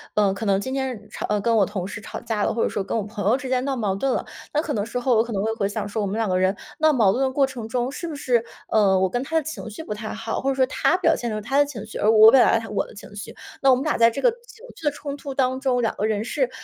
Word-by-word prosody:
呃， 205 -2 +3
可 195 +3 -5
能 195 -1 +3
今 260 +5 -4
天 255 -6 -3
吵 210 0 -2
跟 230 +3 +1
我 205 -3 +4
同 190 -2 -4
事 205 +1 -7
吵 - - -7
架 220 -3 -2
了， - - +1
或 230 - 0
者 - - +2
说 200 - -2
跟 210 - -2
我 215 - -1
朋 210 0 -6
友 250 - +4
之 270 - -7
间 255 0 0
闹 275 -1 -1
矛 205 -6 -1
盾 270 +7 0
了。 - - -1 0.3
那 300 - +2
可 310 -2 -3
能 205 -1 -1
时 245 +2 -3
候 245 -1 +2
我 220 - +4
可 235 - -8
能 195 -2 -1
会 220 - 0
回 200 -3 -1
想 205 0 -3
说， 215 +1 -3
我 200 - -1
们 205 +3 -3
两 225 -2 0
个 185 -1 +1
人 190 +2 +1 0.2
闹 315 0 +5
矛 215 -8 +4
盾 270 - 0
的 260 - +1
过 275 0 +3
程 240 -5 -7
中， 245 +1 -1
是 340 +4 -5
不 310 - -5
是， 245 -4 +1 0.3
呃 195 -3 +4
我 190 - +3
跟 245 +6 -2
他 320 +3 -1
的 315 - +1
情 315 -6 -6
绪 215 +9 -8
不 210 - -4
太 215 +1 -6
好， 225 +1 -3
或 270 - 0
者 270 - 0
说 260 -1 +3
他 305 +5 +1
表 330 -3 +3
现 240 - -3
有 215 - -2
他 255 +7 -2
的 290 - +5
情 225 -7 -7
绪， 215 - -8
而 215 - +4
我 220 0 +8
表 265 - +7
达 230 - +4
有 - - -9
我 205 - 0
的 - - -14
情 205 0 -12
绪， 205 - -7 0.3
那 270 - +4
我 260 - +7
们 255 - -2
俩 305 - +1
在 230 0 +6
这 225 - -5
个 - - +5
情 475 +1 -15
绪 - - -15
的 - - +4
冲 285 0 -6
突 280 -1 -7
当 260 -1 +1
中， 255 -3 +1
两 225 - 0
个 210 - -1
人 215 -1 0
是 260 0 0
230 Hz, 365 characters per minute, -23 LUFS, 210-270 Hz, 0.3 s, 我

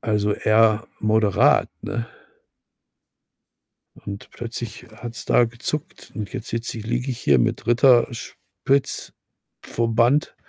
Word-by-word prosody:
Also, 105 -2 0
eher 110 +1 +3
moderat, 110 -2 +3
ne? 115 -1 -3 2.0
Und 100 0 -7
plötzlich 120 0 -7
hat's 120 -1 -7
da 120 - +4
gezuckt 140 +8 -5
und 105 -2 -5
jetzt 130 -4 -6
sitze 115 0 -4
ich 110 - -8
liege 120 +3 -1
ich 120 - -4
hier 70 -2 +4
mit - - -1
Ritterspitz-Verband 120 +1 0
115 Hz, 105 wpm, -23 LUFS, 110-120 Hz, 2.0 s, da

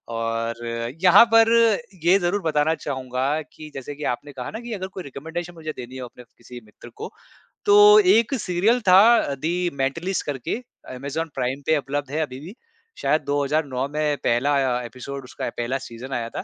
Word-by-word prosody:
और 115 +1 -3 0.4
यहाँ 185 +5 +8
पर 225 0 +6 0.5
ये 180 +3 +5
ज़रूर 185 +3 0
बताना 160 -1 +1
चाहूँगा 130 +1 -2
कि 155 -1 -11
जैसे 135 +2 -7
कि 150 - -8
आपने 145 +4 -7
कहा 125 -2 -6
ना 220 - -6
कि 235 -1 -6
अगर 190 -2 -4
कोई 185 -1 -8
रिकमेंडेशन 165 +5 -7
मुझे 160 -2 -6
देनी 125 +1 -8
है 130 - -6
अपने 125 0 -11
किसी 120 +1 -13
मित्र 105 +3 -15
को, - - -7 0.5
तो 415 0 +8
एक 280 - +4
सीरियल 205 +6 +1
था 185 +1 +8 0.2
अ, 145 - -1
"दी 175 +5 -1
मेंटलिस्ट" 165 +8 -2
करके, 140 - -3 0.4
अमेज़न 145 +5 -4
प्राइम 130 +2 -2
पे 160 - +4
उपलब्ध 140 0 -4
है 155 - -1
अभी 130 -4 -4
भी। 175 +9 -10 0.5
शायद 150 +3 +2
2009 140 -1 -1
में 150 0 -1
पहला 125 +5 +2
आया 130 -3 +1
एपिसोड 130 +3 -8
उसका, 125 - -5
पहला 120 +3 -3
सीज़न 130 +1 -9
आया 115 -2 -3
था। - - -6
145 Hz, 185 wpm, -23 LUFS, 130-175 Hz, 0.5 s, यहाँ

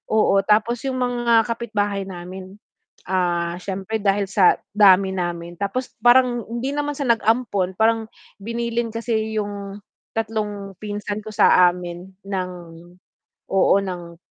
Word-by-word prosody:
Oo, 215 -2 +4
tapos 220 +4 +2
yung 260 - -2
mga 240 -2 +2
kapitbahay 210 -4 -2
namin, 185 +1 -9 0.5
ah, 175 -2 0
siyempre 195 +3 -3
dahil 200 0 +2
sa 195 -2 +4 0.2
dami 195 -2 +6
namin, 175 -1 -4
tapos 205 +6 -3
parang 245 0 +5
hindi 240 +4 -3
naman 290 0 -2
sa 280 - -2
nag-ampon, 225 -5 +1
parang 225 0 +2 0.3
binilin 235 +1 -2
kasi 220 -1 -2
yung 200 -1 -5 0.4
3 210 -3 -3
pinsan 205 0 -4
ko 215 - -8
sa 180 -3 +5
amin 175 +1 -8 0.2
ng 185 -2 -2 1.0
oo 195 0 +4
ng, 175 -3 -6
205 Hz, 125 wpm, -22 LUFS, 190-230 Hz, 1.0 s, dami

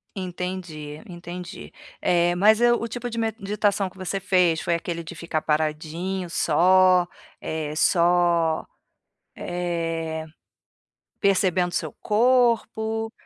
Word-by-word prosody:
Entendi, 180 -5 -5
entendi, 175 - -8 0.3
eh, 175 0 +2
mas 215 +4 +5
eu, 240 0 +3
o 230 - -2
tipo 245 +1 -5
de 230 - -5
meditação 210 -2 0
que - - -22
você 190 +1 -3
fez 180 -4 +2
foi 170 - -1
aquele 170 0 -3
de 165 - -8
ficar 170 -1 -3
paradinho 160 +5 -2
só, 180 +3 +4 0.3
eh, 155 -1 -4
só, 170 -1 +2 0.7
eh, 165 -2 -3 0.9
percebendo 185 -3 +2
seu 155 -4 -3
corpo? 225 -1 +1
180 Hz, 110 wpm, -24 LUFS, 165-200 Hz, 0.9 s, mas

